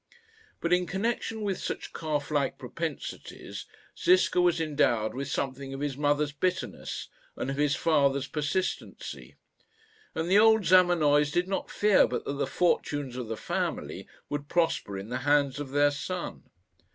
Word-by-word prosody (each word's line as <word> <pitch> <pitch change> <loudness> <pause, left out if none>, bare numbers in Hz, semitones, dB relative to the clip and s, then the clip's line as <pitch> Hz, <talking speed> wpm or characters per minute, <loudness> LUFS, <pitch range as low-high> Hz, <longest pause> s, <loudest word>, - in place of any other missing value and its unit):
But, 170 +1 +1
in 180 0 +2
connection 220 +2 -2
with 195 -3 -1
such - - -5
calf 150 -2 -2
like 145 -3 0
propensities, 160 +5 -6 0.3
Ziska 360 - +4
was 175 -2 +3
endowed 140 -8 +1
with 135 +1 -4
something 135 0 -3
of - - -6
his 145 -2 -2
mother's 145 0 +1
bitterness 180 +5 -3 0.3
and 135 - -3
of 135 - -4
his 145 -1 +2
father's 140 -3 +2
persistency; 150 +6 -3 0.8
and 160 - -1
the 195 +3 +5
old 220 -2 +5
Zamenoys 165 -5 +5
did 175 +3 +1
not 195 - -2
fear 210 -2 +4
but - - -3
that - - -2
the 140 - -1
fortunes 145 -6 0
of 125 -2 -4
the 110 0 -4
family - - -3 0.2
would 145 0 -4
prosper 165 - 0
in 100 +3 -7
the 125 +1 -2
hands 145 0 +2
of 145 -2 -5
their 145 +1 +3
son. 180 +5 -5
145 Hz, 155 wpm, -28 LUFS, 140-180 Hz, 0.8 s, the